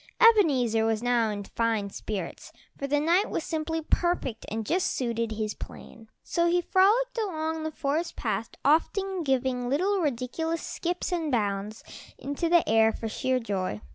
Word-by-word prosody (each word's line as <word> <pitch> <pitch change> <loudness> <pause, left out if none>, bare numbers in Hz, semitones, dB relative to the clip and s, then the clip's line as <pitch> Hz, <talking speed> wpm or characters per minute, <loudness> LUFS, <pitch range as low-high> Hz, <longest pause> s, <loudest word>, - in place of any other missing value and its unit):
Ebenezer 285 - +5
was 225 0 0
now 240 -2 +2
in 205 -1 -4
fine 220 -2 -1
spirits, 195 -5 -5 0.2
for 275 - -4
the 290 +1 +2
night 340 +7 +2
was - - -2
simply 320 0 -2
perfect, 310 -9 -1
and 220 +1 -3
just 360 - +1
suited 230 -3 -1
his 215 -1 -2
plans, 225 -1 -11 0.2
so 340 0 +1
he 350 +1 +3
frolicked 430 +8 +3
along 320 -6 -2
the 315 - -2
forest 310 +4 -2
path, 225 -1 -2 0.2
often 375 +5 +2
giving 260 -3 0
little 380 +9 +1
ridiculous 310 +4 -2
skips 355 +2 -3
and 330 -4 -1
bounds 210 -2 -1 0.3
into 285 +4 -2
the 345 -1 +4
air 220 0 +5
for 225 - -5
sheer 255 +3 0
joy. 190 - -2
275 Hz, 160 wpm, -27 LUFS, 225-340 Hz, 0.3 s, Ebenezer